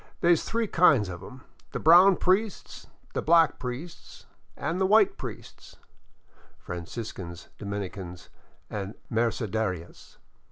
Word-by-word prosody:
They 175 Hz, 0 st, +5 dB
's 165 Hz, -, 0 dB
three 230 Hz, +1 st, -1 dB
kinds 145 Hz, -, +4 dB
of 85 Hz, -1 st, -7 dB
'em: 130 Hz, +6 st, -11 dB, 0.3 s
the -, -, -2 dB
brown 180 Hz, +4 st, +7 dB
priests, 195 Hz, +4 st, -1 dB, 0.3 s
the -, -, -1 dB
black 165 Hz, -1 st, +4 dB
priests, 130 Hz, +7 st, -8 dB, 0.3 s
an' 165 Hz, +5 st, -2 dB
the 190 Hz, -, +2 dB
white 210 Hz, 0 st, +5 dB
priests -, -, -10 dB, 0.4 s
" -, -, -32 dB
(Franciscans, 85 Hz, -1 st, -7 dB
Dominicans, 95 Hz, -3 st, -6 dB, 0.4 s
and 100 Hz, 0 st, -5 dB, 0.2 s
Mercedarias). 110 Hz, -6 st, -2 dB
120 Hz, 120 wpm, -27 LUFS, -, 0.4 s, brown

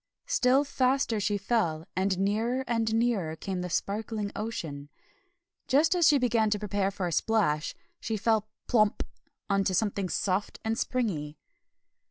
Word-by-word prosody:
Still 275 Hz, -, +3 dB
faster 260 Hz, -4 st, +1 dB
she 205 Hz, 0 st, 0 dB
fell, 185 Hz, -7 st, 0 dB
and 190 Hz, 0 st, +1 dB
nearer 220 Hz, +7 st, 0 dB
and 230 Hz, -2 st, 0 dB
nearer 220 Hz, -8 st, +1 dB
came 185 Hz, +2 st, -4 dB
the 180 Hz, -, -4 dB
sparkling 210 Hz, +2 st, -2 dB
ocean. 160 Hz, -10 st, -5 dB, 0.8 s
Just 285 Hz, +6 st, +4 dB
as 345 Hz, -4 st, +4 dB
she 295 Hz, -, +6 dB
began 230 Hz, -4 st, +2 dB
to 210 Hz, -, +1 dB
prepare 205 Hz, -1 st, -1 dB
for 195 Hz, -2 st, -4 dB
a 175 Hz, -, -2 dB
splash, 170 Hz, -7 st, +1 dB, 0.2 s
she 220 Hz, -1 st, -2 dB
fell 220 Hz, 0 st, +1 dB, 0.2 s
PLOMP 215 Hz, -3 st, +2 dB, 0.4 s
on 195 Hz, -1 st, +2 dB
to 185 Hz, -, 0 dB
something 200 Hz, -2 st, 0 dB
soft 195 Hz, +2 st, -1 dB
and 225 Hz, 0 st, +1 dB
springy. 195 Hz, -, -2 dB
210 Hz, 150 wpm, -28 LUFS, 190-235 Hz, 0.8 s, she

